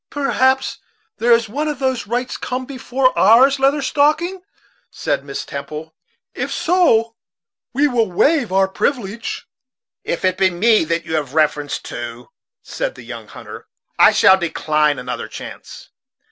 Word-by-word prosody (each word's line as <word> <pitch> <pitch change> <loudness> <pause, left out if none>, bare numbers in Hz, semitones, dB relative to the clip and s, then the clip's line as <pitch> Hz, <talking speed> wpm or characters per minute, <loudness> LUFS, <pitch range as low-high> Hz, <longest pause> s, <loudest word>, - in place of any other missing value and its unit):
"Perhaps 265 -2 +1 0.4
there 240 +1 +2
is 230 -1 +4
one 295 +8 -2
whose 260 -4 -2
rights 245 +3 -2
come 255 +1 -4
before 255 0 0
ours, 260 +7 +5
Leather 275 +2 +2
Stocking," 310 +7 +1 0.5
said - - -2
Miss 140 -1 -6
Temple. 155 +3 -7 0.4
"If - - -4
so, 230 -11 +2 0.6
we 280 +4 +2
will 230 -7 0
waive 275 - +2
our 190 0 +3
privilege." 225 +1 -3 0.6
"If 170 - -3
it 185 0 0
be 190 - +4
me 205 +1 +3
that 165 +1 -2
you - - -5
have 145 -2 -4
reference 150 -2 +1
to," 120 0 -7 0.3
said - - -4
the 125 - -12
young 115 -2 -9
hunter, - - -11 0.3
"I - - +8
shall 190 - +5
decline 155 -3 0
another 125 -1 -5
chance. - - -10
225 Hz, 145 wpm, -19 LUFS, -, 0.6 s, I